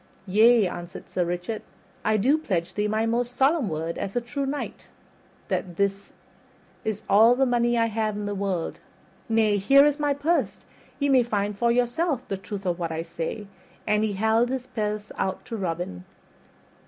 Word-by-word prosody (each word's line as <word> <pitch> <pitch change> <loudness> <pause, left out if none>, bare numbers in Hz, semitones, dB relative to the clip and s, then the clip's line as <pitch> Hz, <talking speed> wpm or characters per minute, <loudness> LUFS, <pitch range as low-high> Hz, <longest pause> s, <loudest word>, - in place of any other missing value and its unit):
"Yea," 215 +2 +5
answered 175 0 -8
Sir 180 - -1
Richard, 175 +5 -3 0.4
"I 215 0 +2
do 255 +9 +3
pledge 185 - -2
thee 210 +2 0
my 215 +1 0
most 240 +2 -1
solemn 275 - +2
word, 160 +1 -3
as 195 - -4
a - - +3
true 270 +4 -4
knight, 285 +2 -5 0.6
that 175 -2 -3
it 200 0 +4 0.9
is 215 -1 -3
all 225 +5 +6
the 270 +1 +3
money 240 -1 +2
I 230 - +3
have 220 -1 -1
in 205 0 -4
the 205 - -2
world. 190 -4 -2 0.5
Nay, 220 -2 +3
here 275 +8 +6
is 295 0 +1
my 290 -1 +1
purse, 285 - 0 0.4
ye 285 - 0
may 265 -2 +6
find 210 -3 -1
for 235 +4 +2
yourselves 250 +4 +1
the 195 - -2
truth 200 +1 -7
of 175 -1 -1
what 170 -2 -2
I 160 0 -3
say." 165 +5 -5 0.4
And 210 0 +2
he 215 -2 0
held 220 +4 +2
his 260 -1 -3
purse 210 -4 -3
out 190 0 -2
to 230 - -5
Robin. 165 - -4
215 Hz, 180 wpm, -25 LUFS, 195-245 Hz, 0.9 s, all